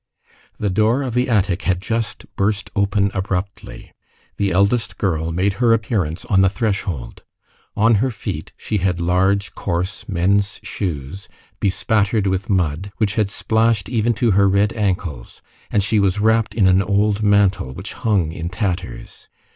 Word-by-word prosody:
The 105 Hz, -2 st, -1 dB
door 110 Hz, +7 st, +2 dB
of 125 Hz, -3 st, -3 dB
the 125 Hz, +1 st, +1 dB
attic 100 Hz, -4 st, +1 dB
had 90 Hz, -2 st, 0 dB
just 115 Hz, +3 st, -3 dB
burst 100 Hz, +1 st, -1 dB
open 100 Hz, -1 st, +1 dB
abruptly. 95 Hz, 0 st, -4 dB, 0.5 s
The 100 Hz, -, +1 dB
eldest 105 Hz, +5 st, +1 dB
girl 85 Hz, -4 st, -1 dB
made 95 Hz, +4 st, +1 dB
her 115 Hz, -2 st, +5 dB
appearance 100 Hz, -8 st, -1 dB
on 95 Hz, -2 st, +3 dB
the 95 Hz, -, +5 dB
threshold. 95 Hz, -, -3 dB, 0.5 s
On 115 Hz, +2 st, +4 dB
her 130 Hz, -, +1 dB
feet, 110 Hz, -5 st, -6 dB
she 105 Hz, -, -2 dB
had 90 Hz, -1 st, 0 dB
large, 95 Hz, +3 st, +1 dB
coarse, 90 Hz, +3 st, -3 dB
men's 100 Hz, +2 st, +1 dB
shoes, 85 Hz, 0 st, -5 dB, 0.3 s
bespattered 105 Hz, +1 st, +1 dB
with 95 Hz, 0 st, -1 dB
mud, 90 Hz, 0 st, 0 dB
which 105 Hz, -3 st, +1 dB
had 105 Hz, -2 st, +1 dB
splashed 110 Hz, 0 st, +1 dB
even 120 Hz, -1 st, +1 dB
to 115 Hz, -1 st, +2 dB
her 100 Hz, 0 st, +4 dB
red 100 Hz, +2 st, +2 dB
ankles, 90 Hz, -, -3 dB, 0.3 s
and 100 Hz, -, +1 dB
she 105 Hz, +2 st, +2 dB
was 100 Hz, 0 st, +1 dB
wrapped 110 Hz, 0 st, +2 dB
in 100 Hz, -4 st, +4 dB
an 95 Hz, +1 st, +4 dB
old 100 Hz, +2 st, +1 dB
mantle 100 Hz, -8 st, +2 dB
which 85 Hz, +9 st, -8 dB
hung 100 Hz, -10 st, 0 dB
in 85 Hz, 0 st, -5 dB
tatters. 100 Hz, +3 st, -4 dB
100 Hz, 155 wpm, -20 LUFS, 95-110 Hz, 0.5 s, her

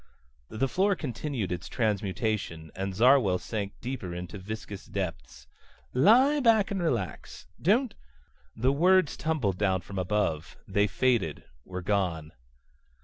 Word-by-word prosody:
The 125 Hz, +5 st, -1 dB
floor 195 Hz, +7 st, +2 dB
continued 125 Hz, -, -4 dB
its 90 Hz, -1 st, -4 dB
transmutation, 105 Hz, -, -2 dB
and 95 Hz, 0 st, -3 dB
Zarwell 120 Hz, -4 st, +5 dB
sank 100 Hz, 0 st, -4 dB
deep 130 Hz, +2 st, -4 dB
into 90 Hz, +2 st, -6 dB
viscous 100 Hz, 0 st, -7 dB
depths. 85 Hz, -11 st, -5 dB, 0.5 s
"Lie 255 Hz, -, +5 dB
back 225 Hz, -6 st, +4 dB
and 195 Hz, -2 st, -1 dB
relax. 110 Hz, -, -3 dB, 0.2 s
Don't 225 Hz, -, +2 dB, 0.4 s
..." 65 Hz, -1 st, -36 dB
The 135 Hz, -, +5 dB
words 180 Hz, +2 st, +4 dB
tumbled 135 Hz, -, -1 dB
down 95 Hz, -3 st, +1 dB
from 100 Hz, 0 st, -6 dB
above. 90 Hz, -5 st, -1 dB
They 100 Hz, +1 st, +2 dB
faded, 115 Hz, -, 0 dB, 0.2 s
were 90 Hz, -1 st, -6 dB
gone. 85 Hz, -6 st, -1 dB
105 Hz, 130 wpm, -28 LUFS, 90-140 Hz, 0.5 s, Zarwell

